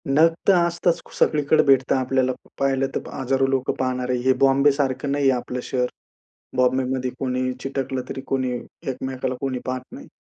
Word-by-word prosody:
नग 160 +4 +5
तर 200 - +7
असताच. 170 0 0
सगळीकडे 150 0 +3
भेटता 135 -1 +4
आपल्याला 130 0 +1 0.3
पाहिलं 135 -1 +1
तर - - -4
हजारो 135 +1 +1
लोकं 135 -1 0
पाहणारे. 125 -1 0
हे 130 +1 +4
बॉम्बेसारखं 135 0 +3
नाहीये 140 -1 +3
आपलं 125 0 -3
शहर. 125 -1 0 0.7
बॉम्बेमध्ये 130 0 +1
कोणी 130 -1 -1
चिटकलं, 135 -1 -3
तरी - - -5
कोणी 130 -1 0 0.4
एकमेकाला 130 0 -3
कोणी 135 -2 -2
पाहत 130 0 -3
नाही. 280 +3 -10
130 Hz, 145 wpm, -23 LUFS, 130-135 Hz, 0.7 s, तर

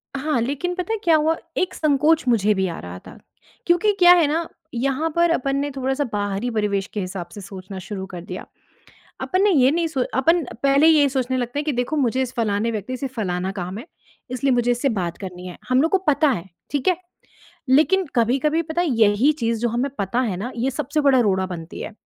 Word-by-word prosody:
हाँ, 285 0 0
लेकिन 285 +9 -2
पता 365 +5 -3
है - - 0
क्या 330 -2 +5
हुआ 310 +1 +2 0.2
एक 370 0 0
संकोच 305 +1 +2
मुझे 215 -3 +3
भी 190 -1 0
आ 170 - -5
रहा 90 +1 -8
था। - - -12 0.5
क्योंकि 350 +5 +3
क्या 355 -1 +8
है 340 -4 +4
ना 325 +3 -1 0.3
यहाँ 270 +6 0
पर 340 0 +3
अपन 275 -4 0
ने 285 +1 -1
थोड़ा-सा 265 +1 -1
बाहरी 205 +3 -1
परिवेश 205 -3 -1
के 210 - -2
हिसाब 185 -2 -5
से 205 - -8
सोचना 190 0 -9
शुरू 190 +1 -6
कर 180 -2 -8
दिया 180 +1 -7 0.8
अपन 370 +1 0
ने 415 - +4
ये 270 -7 +5
नहीं 335 +2 0
सो 275 -5 -1 0.2
अपन 330 +6 +3 0.2
पहले 280 +2 +4
ये 305 -3 +5
सोचने 260 -1 -1
लगते 245 +2 -3
हैं 295 - -1
कि 300 - 0
देखो 245 +4 -1
मुझे 260 -2 +1
इस 255 -1 -4
फलाने 220 -1 0
व्यक्ति 225 +3 -4
से 275 - -4
फलाना 185 -3 -2
काम 185 0 -5
है 240 - -9 0.4
इसलिए 255 +2 0
मुझे 240 0 +1
इससे 245 +3 +1
बात 180 -8 -2
करनी 180 -2 -8
है। 180 - -8
हम 255 +1 +3
लोग 325 - +1
को 385 - +3
पता 305 -4 +2
है 175 -10 -2 0.3
ठीक 285 +3 0
है, 365 - +3 0.7
लेकिन 340 +8 +4
कभी-कभी 265 +7 +2
पता 325 +1 -2
है 350 - 0
यही 225 +1 +3
चीज़ 230 -1 0
जो 240 - +1
हमें 245 +5 -1
पता 200 +5 -1
है 215 -8 -2
ना 225 +7 -4
ये 245 +3 -1
सबसे 285 +4 -1
बड़ा 275 -3 +4
रोड़ा 190 -5 +2
बनती 170 -3 -7
है। - - -6
255 Hz, 225 wpm, -22 LUFS, 205-300 Hz, 0.8 s, क्या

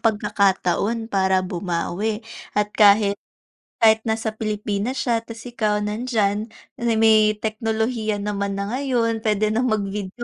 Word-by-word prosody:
pagkakataon 210 +1 0
para 190 -1 +2
bumawi 185 +4 -3 0.3
at 210 0 +1
kahit, 205 -1 +4 0.6
kahit 220 0 +6
nasa 220 0 -1
Pilipinas 215 +2 -3
siya 235 -2 +1
'tas 230 0 -11
ikaw 215 -4 -1
nandiyan, 215 -1 -1 0.3
na 235 -1 +1
may 215 -1 +4
teknolohiya 220 0 -2
naman 200 -1 -3
na 200 +2 -3
ngayon, 245 -4 0
pwede 215 -1 +1
nang 240 +4 +1
mag-video 205 0 -3
215 Hz, 125 wpm, -22 LUFS, 200-225 Hz, 0.6 s, kahit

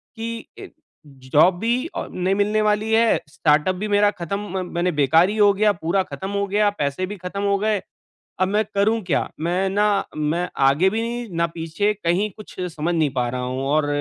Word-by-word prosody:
कि 230 0 -5
ज 395 - -9 0.6
जॉब 175 +4 +5
भी 245 +8 0
नहीं 185 +2 -1
मिलने 210 +1 +1
वाली 215 +1 +1
है, 225 0 +4
स्टार्टअप 150 +3 +2
भी 210 +4 -4
मेरा 205 0 +4
ख़त्म 195 +1 -4 0.2
म 185 - -1
मैंने 175 +1 +1
बेकार 160 +5 +4
ही 215 - -3
हो 205 -1 +6
गया, 210 +1 +3
पूरा 175 +3 0
ख़त्म 190 +1 -7
हो 200 0 0
गया, 205 +1 +2
पैसे 150 -2 -2
भी 205 +2 -7
ख़त्म 185 +3 -5
हो 200 0 +2
गए, 210 -1 0 0.6
अब 185 - +3
मैं 210 +3 +1
करूँ 220 +3 +2
क्या? 175 -5 0
मैं 180 +4 0
ना 205 0 +1
मैं 160 +4 0 0.2
आगे 155 +8 +4
भी 220 +3 -2
नहीं, 235 -1 -4
ना 170 - +2
पीछे 165 +6 -1
कहीं 195 +2 0
कुछ 215 - -12 0.2
समझ 165 +3 -1
नहीं 155 -3 +2
पा 125 -1 0
रहा 125 +1 -3
हूँ 130 +1 -3
और 150 0 +2
195 Hz, 200 wpm, -22 LUFS, 170-210 Hz, 0.6 s, हो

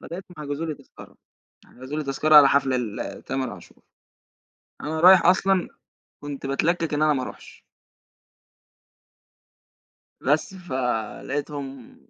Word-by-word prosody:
لغاية 175 +3 -8
ما 155 - -8
حجزوا 145 +3 -4
لي 155 - -3
تذكرة، - - -16 0.5
حجزوا 130 +4 -8
لي 155 - -3
تذكرة 150 +3 +3
على 145 -2 +9
حفلة 135 -2 +2
لتامر 125 +3 -4
عاشور. - - -14 1.0
أنا 155 +1 -3
رايح 185 +1 +7
أصلًا 185 0 +3 0.5
كنت 145 -2 -6
باتلكك 165 +3 0
إن 145 - 0
أنا 155 0 +4
ما 135 -3 -1
أروحش. 470 - -11 2.6
بس، 235 -7 0
فلقيتهم 135 - -4
145 Hz, 115 wpm, -24 LUFS, 135-165 Hz, 2.6 s, على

